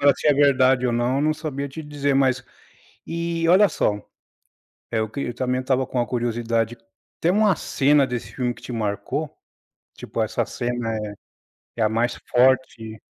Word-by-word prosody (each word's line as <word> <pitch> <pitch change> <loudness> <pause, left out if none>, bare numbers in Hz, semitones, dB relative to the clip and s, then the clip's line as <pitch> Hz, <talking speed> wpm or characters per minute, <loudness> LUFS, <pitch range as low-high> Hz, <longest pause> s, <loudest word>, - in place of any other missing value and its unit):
Agora 140 0 +5
se - - -3
é 145 - +5
verdade 130 -3 +4
ou 120 - 0
não, 120 +3 +1
eu 140 - +1
não 155 0 +2
sabia 140 -2 -4
te 160 +4 -8
dizer, 145 -2 -1
mas 130 -1 +2 0.6
e, 170 0 -2
olha 195 +3 +7
só, 105 -8 0 0.9
é 110 -1 +1
o 110 - -2
que 140 +5 -5
eu 120 - -3
também 125 0 -1
estava 130 0 +1
com 125 - -2
a 120 - 0
curiosidade, 115 -1 -1 0.4
tem 170 - +2
uma 205 -3 +3
cena 140 0 +2
desse 125 -2 -5
filme 125 -2 -1
que - - -17
te - - -8
marcou? 105 -3 -2 0.7
Tipo, - - -4
essa - - -1
cena 120 -2 -3
é 105 -1 -4 0.7
é - - -2
a 110 - +3
mais 115 +2 0 0.2
forte 120 -3 +2
130 Hz, 180 wpm, -23 LUFS, 120-145 Hz, 0.9 s, olha